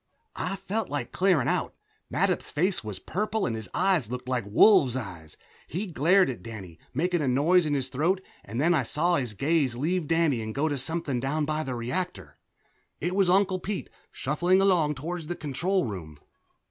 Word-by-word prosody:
I 190 Hz, -, -2 dB
felt 215 Hz, +2 st, -3 dB
like 145 Hz, 0 st, -3 dB
clearing 180 Hz, -9 st, +2 dB
out. -, -, -1 dB, 0.4 s
Mattup's -, -, 0 dB
face 180 Hz, +2 st, 0 dB
was 105 Hz, -3 st, -5 dB
purple 210 Hz, -, -2 dB
and 115 Hz, -, -1 dB
his 110 Hz, -4 st, -6 dB
eyes 180 Hz, -, +1 dB
looked 125 Hz, +1 st, -5 dB
like 125 Hz, -4 st, -1 dB
wolves' 135 Hz, -, +5 dB
eyes. 90 Hz, -11 st, -7 dB, 0.3 s
He 185 Hz, +6 st, -3 dB
glared 180 Hz, +2 st, +3 dB
at 130 Hz, -3 st, -5 dB
Danny, 95 Hz, -8 st, -9 dB
making 175 Hz, +5 st, 0 dB
a 140 Hz, -, 0 dB
noise 155 Hz, +7 st, +3 dB
in 145 Hz, -, +1 dB
his 135 Hz, -2 st, -2 dB
throat, 165 Hz, +9 st, +1 dB, 0.2 s
and 115 Hz, +4 st, -5 dB
then 165 Hz, +5 st, +4 dB
I 165 Hz, -, +3 dB
saw 175 Hz, +3 st, +1 dB
his 120 Hz, -6 st, -3 dB
gaze 140 Hz, -, +1 dB
leave 160 Hz, +5 st, -1 dB
Danny 165 Hz, -7 st, +2 dB
and 110 Hz, 0 st, -5 dB
go 145 Hz, +3 st, +1 dB
to 145 Hz, -3 st, -2 dB
something 145 Hz, -2 st, -1 dB
down 145 Hz, +4 st, -1 dB
by 155 Hz, +1 st, -1 dB
the 130 Hz, -4 st, -4 dB
reactor. 120 Hz, -, -4 dB, 0.6 s
It 175 Hz, +3 st, -2 dB
was 195 Hz, -2 st, +3 dB
Uncle 190 Hz, 0 st, +3 dB
Pete, 200 Hz, +2 st, -4 dB, 0.2 s
shuffling 175 Hz, +7 st, +1 dB
along 175 Hz, -6 st, +3 dB
toward 165 Hz, +4 st, -5 dB
the 175 Hz, -, -3 dB
control 170 Hz, +5 st, 0 dB
room. 85 Hz, -9 st, -7 dB
150 Hz, 185 wpm, -27 LUFS, 125-180 Hz, 0.6 s, wolves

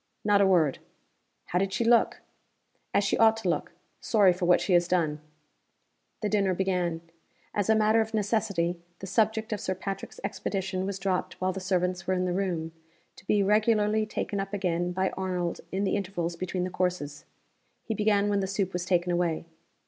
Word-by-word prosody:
"Not 205 Hz, -1 st, +4 dB
a 195 Hz, -, +5 dB
word." 165 Hz, -7 st, +3 dB, 0.7 s
"How 180 Hz, -, 0 dB
did 195 Hz, 0 st, 0 dB
she 235 Hz, -, 0 dB
look?" 235 Hz, 0 st, +3 dB, 0.7 s
"As 205 Hz, -, +2 dB
she 200 Hz, -, 0 dB
ought 225 Hz, 0 st, +6 dB
to 195 Hz, -5 st, -2 dB
look 170 Hz, +1 st, -2 dB, 0.3 s
sorry 200 Hz, -5 st, +4 dB
for 180 Hz, 0 st, -2 dB
what 175 Hz, 0 st, +5 dB
she 190 Hz, -, 0 dB
has 175 Hz, 0 st, +4 dB
done." 160 Hz, -4 st, +1 dB, 1.0 s
The -, -, +2 dB
dinner 195 Hz, -3 st, +2 dB
began. 180 Hz, -3 st, 0 dB, 0.5 s
As 205 Hz, 0 st, -1 dB
a 220 Hz, -, +6 dB
matter 215 Hz, +1 st, +4 dB
of 220 Hz, 0 st, -3 dB
necessity, 200 Hz, -5 st, 0 dB, 0.2 s
the 195 Hz, -, -8 dB
subject 220 Hz, +3 st, +1 dB
of 210 Hz, -, -3 dB
Sir 185 Hz, -, -2 dB
Patrick's 195 Hz, +1 st, -6 dB
expedition 190 Hz, -1 st, -2 dB
was 200 Hz, -1 st, -3 dB
dropped 185 Hz, -1 st, -2 dB
while 185 Hz, 0 st, 0 dB
the 190 Hz, -, -4 dB
servants 185 Hz, -1 st, -1 dB
were 185 Hz, -, +2 dB
in 180 Hz, 0 st, 0 dB
the 180 Hz, -, -1 dB
room 175 Hz, -4 st, -2 dB, 0.4 s
to 190 Hz, -, -17 dB
be 205 Hz, -1 st, +3 dB
regularly 215 Hz, +1 st, +2 dB
taken 205 Hz, -1 st, -3 dB
up 195 Hz, +1 st, -3 dB
again 175 Hz, -2 st, -1 dB
by 190 Hz, +1 st, 0 dB
Arnold 180 Hz, -2 st, -3 dB
in 195 Hz, +2 st, -1 dB
the 195 Hz, -, +1 dB
intervals 180 Hz, -4 st, -2 dB
between 185 Hz, +1 st, -3 dB
the 185 Hz, -, -3 dB
courses. 175 Hz, -6 st, -2 dB, 0.6 s
He 225 Hz, -, -2 dB
began 210 Hz, -1 st, +2 dB
when 205 Hz, -1 st, +1 dB
the 190 Hz, -, -1 dB
soup 195 Hz, -1 st, -1 dB
was 180 Hz, 0 st, -2 dB
taken 175 Hz, -1 st, +1 dB
away. 175 Hz, -2 st, 0 dB
190 Hz, 190 wpm, -28 LUFS, 180-205 Hz, 1.0 s, ought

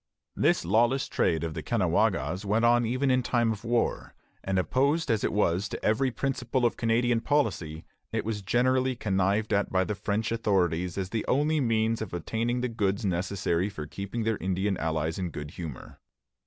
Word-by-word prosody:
This -, -, +2 dB
lawless 120 Hz, +8 st, +2 dB
trade 80 Hz, 0 st, +1 dB
of 80 Hz, -1 st, -3 dB
the 80 Hz, -, -4 dB
Caughnawagas 100 Hz, -1 st, +1 dB
went 110 Hz, +3 st, +1 dB
on 120 Hz, 0 st, +4 dB
even 130 Hz, +3 st, +1 dB
in 130 Hz, 0 st, +3 dB
time 120 Hz, -2 st, +1 dB
of 105 Hz, 0 st, -5 dB
war; 120 Hz, 0 st, -1 dB, 0.3 s
and 95 Hz, 0 st, -1 dB
opposed 140 Hz, -, +1 dB
as 110 Hz, -2 st, +1 dB
it -, -, +1 dB
was 100 Hz, -1 st, +1 dB
to -, -, -6 dB
every 120 Hz, +5 st, +2 dB
principle 125 Hz, -1 st, -1 dB
of 120 Hz, -, +1 dB
Canadian 115 Hz, 0 st, +1 dB
policy, 100 Hz, -, -1 dB, 0.3 s
it -, -, -2 dB
was 110 Hz, -2 st, -2 dB
generally 130 Hz, +5 st, +1 dB
connived 100 Hz, 0 st, 0 dB
at 100 Hz, 0 st, +1 dB
by 95 Hz, 0 st, +2 dB
the 105 Hz, -, -2 dB
French 105 Hz, +2 st, -2 dB
authorities 90 Hz, -6 st, 0 dB
as 95 Hz, -2 st, -2 dB
the 110 Hz, -2 st, -1 dB
only 150 Hz, +4 st, +2 dB
means 115 Hz, -2 st, +1 dB
of 110 Hz, -, -4 dB
obtaining 115 Hz, +7 st, -1 dB
the 125 Hz, -, 0 dB
goods 105 Hz, -3 st, -1 dB
necessary 95 Hz, 0 st, 0 dB
for 80 Hz, -7 st, -7 dB
keeping 100 Hz, +8 st, -5 dB
their 110 Hz, -1 st, 0 dB
Indian 95 Hz, +2 st, -1 dB
allies 80 Hz, +1 st, -1 dB
in 90 Hz, -2 st, -2 dB
good 75 Hz, -1 st, -7 dB
humor. 80 Hz, -6 st, -8 dB
110 Hz, 180 wpm, -28 LUFS, 95-120 Hz, 0.3 s, on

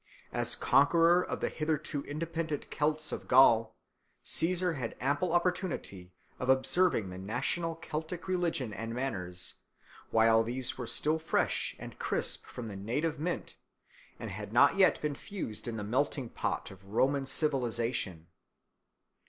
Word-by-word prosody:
As -, -, +2 dB
conqueror 165 Hz, +5 st, +4 dB
of -, -, -4 dB
the -, -, 0 dB
hitherto 155 Hz, -2 st, -2 dB
independent 160 Hz, 0 st, -4 dB
Celts 155 Hz, +1 st, +1 dB
of -, -, -5 dB
Gaul, 115 Hz, -3 st, +5 dB, 0.5 s
Caesar 180 Hz, +1 st, +2 dB
had 125 Hz, -6 st, -4 dB
ample 145 Hz, +7 st, 0 dB
opportunity 175 Hz, -, -1 dB, 0.3 s
of 125 Hz, -, -3 dB
observing 130 Hz, -, +3 dB
the 90 Hz, -, -7 dB
national 125 Hz, -, -2 dB
Celtic 160 Hz, +2 st, -5 dB
religion 170 Hz, -, -1 dB
and 115 Hz, +2 st, -5 dB
manners, 90 Hz, -9 st, -3 dB, 0.5 s
while 115 Hz, 0 st, +5 dB
these 125 Hz, +2 st, -2 dB
were 125 Hz, -2 st, -6 dB
still 155 Hz, +7 st, +1 dB
fresh 160 Hz, -, 0 dB
and -, -, -10 dB
crisp -, -, -1 dB
from 120 Hz, -2 st, -7 dB
the 105 Hz, -, -7 dB
native 145 Hz, +10 st, -2 dB
mint 170 Hz, +3 st, -3 dB, 0.6 s
and -, -, -6 dB
had -, -, -6 dB
not -, -, +5 dB
yet 195 Hz, -1 st, +4 dB
been 150 Hz, -1 st, 0 dB
fused 140 Hz, -, -6 dB
in 115 Hz, -1 st, -3 dB
the 105 Hz, -, -4 dB
melting 130 Hz, +3 st, -1 dB
pot -, -, -3 dB
of 95 Hz, 0 st, -14 dB
Roman 135 Hz, +7 st, +1 dB
civilisation. 120 Hz, -, 0 dB
135 Hz, 140 wpm, -31 LUFS, 115-165 Hz, 0.6 s, Gaul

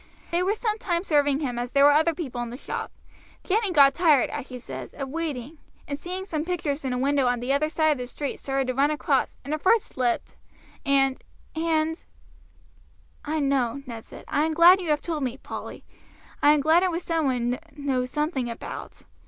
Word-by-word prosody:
They 340 Hz, +1 st, +1 dB
were 385 Hz, +4 st, +1 dB
some 435 Hz, -1 st, -2 dB
time 345 Hz, -3 st, -1 dB
serving 290 Hz, -4 st, +2 dB
him 245 Hz, -4 st, -2 dB
as 245 Hz, +1 st, -4 dB
there 280 Hz, 0 st, +5 dB
were 290 Hz, -, +8 dB
other 315 Hz, +2 st, +3 dB
people 265 Hz, -8 st, -4 dB
in 240 Hz, -, -4 dB
the 245 Hz, -, -7 dB
shop. -, -, -5 dB, 0.5 s
Jenny 415 Hz, 0 st, +1 dB
got 280 Hz, -4 st, +6 dB
tired, 305 Hz, -5 st, +3 dB
as 280 Hz, -2 st, -5 dB
she 255 Hz, -, -7 dB
says, 245 Hz, -, -8 dB
of 275 Hz, -2 st, -5 dB
waiting, 300 Hz, -2 st, -4 dB, 0.3 s
and 285 Hz, -, -2 dB
seeing 365 Hz, +6 st, -5 dB
some 310 Hz, -6 st, -2 dB
pictures 315 Hz, -4 st, -2 dB
in 260 Hz, -, -2 dB
a 250 Hz, -, -1 dB
window 275 Hz, 0 st, +2 dB
on 245 Hz, -1 st, +1 dB
the 250 Hz, +3 st, 0 dB
other 305 Hz, +2 st, +1 dB
side 315 Hz, -1 st, +2 dB
of 295 Hz, -, 0 dB
the 250 Hz, -, -4 dB
street 280 Hz, +3 st, -5 dB
started 270 Hz, -1 st, -1 dB
to 255 Hz, -, -1 dB
run 275 Hz, +3 st, +3 dB
across, 305 Hz, 0 st, 0 dB
and 285 Hz, -, -3 dB
her 310 Hz, -, -1 dB
foot 450 Hz, +8 st, +4 dB
slipped, 250 Hz, -, -2 dB, 0.5 s
and 270 Hz, -1 st, +2 dB, 0.3 s
and 320 Hz, 0 st, 0 dB, 0.6 s
" -, -, -28 dB
"I 315 Hz, -, 0 dB
know," 275 Hz, -1 st, 0 dB
Ned 230 Hz, -3 st, -7 dB
said. -, -, -12 dB
"I 290 Hz, -, +1 dB
am 320 Hz, -, -2 dB
glad 350 Hz, +3 st, +7 dB
you 345 Hz, -, -4 dB
have 295 Hz, -1 st, +1 dB
told 320 Hz, -3 st, -3 dB
me, 255 Hz, -1 st, -2 dB
Polly. -, -, -8 dB, 0.6 s
I 295 Hz, -, +7 dB
am 300 Hz, -, +2 dB
glad 320 Hz, +4 st, +4 dB
it 375 Hz, -, +2 dB
was 340 Hz, 0 st, -3 dB
some 330 Hz, -2 st, 0 dB
one 245 Hz, -2 st, 0 dB
one 250 Hz, -, -2 dB, 0.2 s
knows 265 Hz, -4 st, -1 dB
something 290 Hz, -3 st, -1 dB
about. 230 Hz, -, -8 dB
290 Hz, 220 wpm, -25 LUFS, 265-330 Hz, 0.6 s, were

